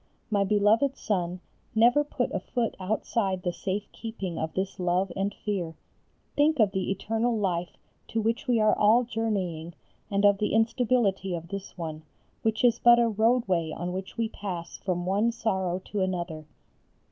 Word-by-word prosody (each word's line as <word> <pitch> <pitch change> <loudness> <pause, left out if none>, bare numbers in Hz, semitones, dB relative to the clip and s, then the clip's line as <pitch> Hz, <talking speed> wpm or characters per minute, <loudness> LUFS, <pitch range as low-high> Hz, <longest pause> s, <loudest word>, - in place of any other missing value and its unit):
My 200 -1 +3
beloved 210 +7 +3
son, 180 -4 -2 0.3
never 240 +6 +5
put 275 -3 -2
a - - 0
foot 230 +5 -2
outside 195 -1 -1
the 175 - -1
safe 195 +3 -2
keeping 200 -7 -5
of 160 - -2
this 190 +1 -2
love 180 +1 +1
and 195 +1 0
fear. 185 -6 -3 0.6
Think 300 0 +3
of 210 -3 +5
the 190 -1 -2
eternal 225 +4 0
life 180 -4 -1 0.3
to 225 - -2
which 225 +5 -1
we 240 -2 +3
are 215 0 +4
all 220 +4 +5
journeying 190 -8 -2 0.3
and 200 0 +2
of 200 -1 +5
the 210 - 0
instability 225 -5 +2
of 170 0 -7
this 195 0 -7
one, 160 -2 -5 0.4
which 220 +1 0
is 240 -1 +4
but 240 0 +7
a 235 0 +4
roadway 215 -6 +2
on 175 +3 -4
which 190 +3 -6
we 230 -1 +1
pass 185 -6 -6
from 175 -2 -2
one 205 +5 +2
sorrow 190 -6 -1
to 210 - -1
another. 175 -4 -2
200 Hz, 170 wpm, -27 LUFS, 180-225 Hz, 0.6 s, but